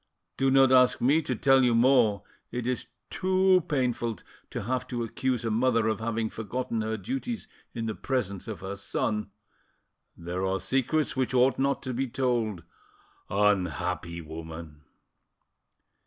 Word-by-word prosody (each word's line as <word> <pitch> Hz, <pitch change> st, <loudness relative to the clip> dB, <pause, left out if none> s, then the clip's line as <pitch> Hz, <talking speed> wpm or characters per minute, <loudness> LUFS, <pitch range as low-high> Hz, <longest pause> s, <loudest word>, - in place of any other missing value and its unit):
Do 135 Hz, 0 st, +2 dB
not 135 Hz, 0 st, +5 dB
ask 125 Hz, -1 st, +5 dB
me 145 Hz, +6 st, +3 dB
to 130 Hz, -4 st, -2 dB
tell 135 Hz, +2 st, +4 dB
you 120 Hz, -2 st, +3 dB
more; 115 Hz, -5 st, +4 dB, 0.3 s
it 125 Hz, -1 st, -4 dB
is 125 Hz, 0 st, -2 dB, 0.2 s
too 185 Hz, -1 st, +3 dB
painful 120 Hz, -5 st, 0 dB, 0.3 s
to -, -, -4 dB
have 125 Hz, +4 st, -2 dB
to 120 Hz, -1 st, -3 dB
accuse 125 Hz, +1 st, -2 dB
a 115 Hz, -, 0 dB
mother 115 Hz, 0 st, +2 dB
of 110 Hz, -1 st, 0 dB
having 115 Hz, 0 st, -1 dB
forgotten 115 Hz, +1 st, -3 dB
her 110 Hz, 0 st, -2 dB
duties 245 Hz, -, -4 dB, 0.3 s
in 115 Hz, -1 st, -3 dB
the 110 Hz, -, -2 dB
presence 105 Hz, -6 st, -2 dB
of 110 Hz, -3 st, -6 dB
her 95 Hz, +1 st, -5 dB
son... 105 Hz, +1 st, -2 dB, 0.9 s
there 90 Hz, +2 st, -4 dB
are 95 Hz, 0 st, 0 dB
secrets 135 Hz, -, 0 dB
which 130 Hz, -1 st, 0 dB
ought 130 Hz, +2 st, +4 dB
not 140 Hz, +1 st, +1 dB
to 130 Hz, -2 st, -3 dB
be 130 Hz, +2 st, -1 dB
told—unhappy 95 Hz, -, -2 dB
woman!" 80 Hz, -1 st, -9 dB
115 Hz, 145 wpm, -28 LUFS, 100-130 Hz, 0.9 s, not